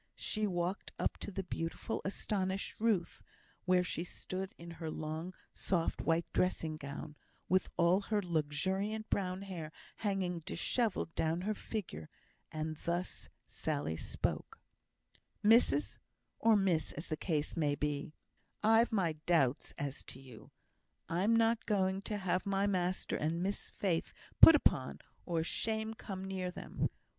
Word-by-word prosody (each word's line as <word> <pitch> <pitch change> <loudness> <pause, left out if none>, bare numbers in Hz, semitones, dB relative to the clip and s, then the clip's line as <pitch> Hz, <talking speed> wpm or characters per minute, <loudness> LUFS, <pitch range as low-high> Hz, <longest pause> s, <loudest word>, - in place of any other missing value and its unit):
She 215 -1 0
walked 180 +1 -2
up - - -1
to - - -4
the 195 0 -3
beautiful, 165 -2 -3
astonished 195 -1 -1
Ruth, 215 -6 +1 0.4
where 180 0 +4
she 170 -1 -2
stood 185 +1 -5
in 170 0 -9
her 160 - -2
long, 160 +4 -4 0.2
soft, 170 -3 0
white 165 +1 +2
dressing 165 -3 +1
gown, 145 0 -7 0.3
with 185 0 +2
all 175 +3 +4
her 210 +1 0
luxuriant 190 +6 -1
brown 185 -1 0
hair 170 -6 -6 0.3
hanging 190 -4 -1
dishevelled 200 +1 0
down 160 +2 0
her 210 +3 0
figure, 175 - -5 0.4
and 155 0 -3
thus 175 +3 -3 0.2
Sally 75 +3 -2
spoke: 80 - -3 0.8
"Missus 210 - +4 0.4
or 225 -1 +5
miss, 180 -7 +2
as 160 - -7
the 155 - 0
case 155 -2 -1
may 150 -4 +2
be 150 +1 -2 0.5
I've 225 +2 +5
my 185 -7 +2
doubts 145 -7 +3
as 140 -1 -3
to 130 - -8
you. 130 -4 -13 0.6
I'm 195 +7 +3
not 230 0 +3
going 190 -2 +2
to 210 - -1
have 185 -2 0
my 195 0 +2
master 185 -2 0
and 165 +3 0
Miss 200 +2 -2
Faith 175 -5 -1 0.3
put 325 - +12
upon, 130 - +2 0.3
or 165 -2 +1
shame 220 +5 -1
come 190 -3 -6
near 190 -1 -2
them. 180 - -2
180 Hz, 140 wpm, -34 LUFS, 160-200 Hz, 0.8 s, put